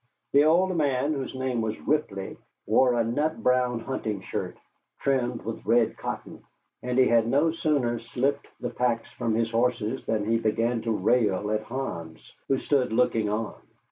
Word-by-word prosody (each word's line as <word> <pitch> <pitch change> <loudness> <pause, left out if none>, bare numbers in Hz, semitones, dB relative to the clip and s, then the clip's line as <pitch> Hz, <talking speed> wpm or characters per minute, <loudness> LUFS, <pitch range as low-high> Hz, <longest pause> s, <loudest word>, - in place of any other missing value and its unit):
The 145 +2 +6
old 180 +4 +3
man, 145 -2 +1
whose 135 -2 -4
name 130 -2 -1
was 110 -1 -3
Ripley, 110 -11 -1 0.3
wore 125 -2 +4
a 115 - +2
nut 145 +8 -1
brown 125 -2 +2
hunting 110 -6 -3
shirt - - -4 0.4
trimmed 125 -3 0
with 115 0 -5
red 115 0 +3
cotton; - - -6 0.4
and 125 0 -2
he 130 - +6
had 115 -2 +3
no 145 +6 +3
sooner 145 -8 0
slipped 135 +5 -1
the - - -4
packs 120 -2 -1
from 115 -1 -1
his 115 0 0
horses 120 +1 0
than 110 -2 0
he 115 +1 +2
began 115 +1 0
to 115 0 -2
rail 105 -1 +1
at 110 0 0
Hans, 85 -11 -6
who 135 - +2
stood 130 -3 +1
looking 110 -2 +2
on. 105 -2 -2
120 Hz, 170 wpm, -26 LUFS, 110-135 Hz, 0.4 s, The